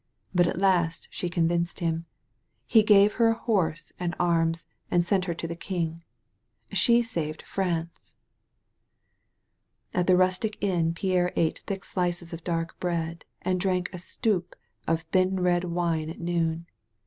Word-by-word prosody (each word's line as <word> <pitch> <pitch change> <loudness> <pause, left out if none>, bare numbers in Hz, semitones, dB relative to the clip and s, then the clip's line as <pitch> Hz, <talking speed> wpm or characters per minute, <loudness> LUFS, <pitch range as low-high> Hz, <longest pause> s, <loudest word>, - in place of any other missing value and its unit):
But 175 -1 +4
at - - -2
last 175 -4 +2
she 180 - -3
convinced 170 +1 0
him. 165 -1 -1 0.6
He 225 - +6
gave 210 -1 +6
her 230 - +7
a 225 - +4
horse 170 -10 0
and 175 -1 -2
arms 165 -1 +1 0.2
and 175 -1 +2
sent 185 +1 +1
her 170 -2 -2
to 165 - -4
the 170 - -4
king. 170 -2 -3 0.7
She 240 -1 +4
saved 160 -9 -4
Prance." 170 -3 -3 1.8
At 180 -1 +1
the 185 -1 +6
rustic 185 +4 +1
inn 170 -4 +1
Pierre 180 -1 +1
ate 160 -1 +1
thick 195 -1 -4
slices 175 -2 -2
of 165 0 -7
dark 165 -1 -2
bread 170 -2 -2 0.2
and 185 0 +1
drank 180 -1 0
a 180 - -6
stoup 185 0 -1 0.3
of 165 0 +1
thin 185 +3 +1
red 180 0 +2
wine 170 -2 -1
at 165 - -8
noon. 170 -1 -1
175 Hz, 150 wpm, -27 LUFS, 165-185 Hz, 1.8 s, her